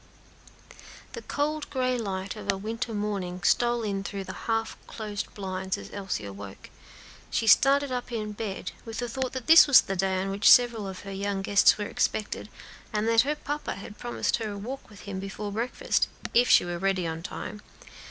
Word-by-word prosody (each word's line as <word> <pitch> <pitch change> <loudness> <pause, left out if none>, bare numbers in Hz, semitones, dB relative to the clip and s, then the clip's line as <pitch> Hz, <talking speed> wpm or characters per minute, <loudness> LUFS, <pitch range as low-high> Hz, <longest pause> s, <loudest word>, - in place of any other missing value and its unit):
The 470 - -6
cold 300 -2 -2
gray 255 -2 0
light 195 -4 -3
of 215 - -1
a 195 - -4
winter 225 +4 -4
morning 200 -4 -3
was - - +3
stealing 235 -4 +1
in 195 - -4
through 195 0 -5
the - - -7 0.2
half 225 0 0
closed 210 -2 -5
blinds 190 -1 -3
as - - -10
Elsie 195 - -3
awoke, 100 0 -9 0.7
and 225 - -2
started 275 +5 +5
up 250 -1 -3
in 215 -2 -3
bed, 205 -2 -5
with 225 -1 -7
the 245 - -2
thought 255 +2 -3
that 260 -3 -5
this 325 0 +9
was 285 - +8
the 195 - -4
day 190 0 0
on 195 +1 -2
which 200 +2 +4
several 235 -4 +5
of 190 -1 -7
her 200 - -8
young 195 0 -2
guests 200 +1 +5
were 210 - -3
expected, 210 +1 -2 0.4
and 215 0 0
that 230 0 +6
her 290 +4 -1
papa 295 0 -4
had 200 +2 -10
promised 240 -1 -1
her 225 -2 -4
a - - -6
walk 250 +7 -7
with 205 - -14
him 195 -2 -5
before 200 +1 -5
breakfast, 245 - 0 0.3
if 245 +1 +4
she - - +6
were 175 0 -4
ready 190 -1 0
in 160 0 -3
time. 210 +4 -7
210 Hz, 200 wpm, -27 LUFS, 195-240 Hz, 0.7 s, this